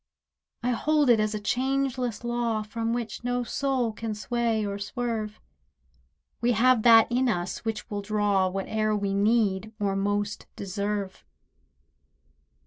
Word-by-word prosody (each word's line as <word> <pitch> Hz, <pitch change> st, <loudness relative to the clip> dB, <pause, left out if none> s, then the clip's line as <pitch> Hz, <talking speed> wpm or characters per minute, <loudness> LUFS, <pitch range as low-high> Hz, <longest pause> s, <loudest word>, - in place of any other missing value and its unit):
I 250 Hz, -, +1 dB
hold 290 Hz, +2 st, +3 dB
it 225 Hz, -, +5 dB
as 215 Hz, 0 st, 0 dB
a -, -, -2 dB
changeless 255 Hz, 0 st, -1 dB
law 235 Hz, -2 st, -1 dB
From 225 Hz, +2 st, -3 dB
which 235 Hz, 0 st, -3 dB
no 245 Hz, 0 st, 0 dB
soul 255 Hz, -2 st, -1 dB
can 220 Hz, 0 st, -4 dB
sway 230 Hz, 0 st, 0 dB
or 200 Hz, 0 st, -3 dB
swerve, 215 Hz, -1 st, -3 dB, 1.0 s
We 240 Hz, +1 st, +3 dB
have 245 Hz, +1 st, +4 dB
that 225 Hz, -1 st, +8 dB
in 250 Hz, +1 st, +2 dB
us 175 Hz, -4 st, -2 dB
which 225 Hz, -1 st, -3 dB
will 205 Hz, -1 st, -4 dB
draw 200 Hz, -2 st, +1 dB
Whate'er 215 Hz, +3 st, -1 dB
we 200 Hz, -1 st, -1 dB
need 210 Hz, 0 st, +1 dB
or 200 Hz, -1 st, 0 dB
most 205 Hz, +1 st, -1 dB
deserve. 200 Hz, 0 st, -3 dB
220 Hz, 135 wpm, -27 LUFS, 205-240 Hz, 1.0 s, that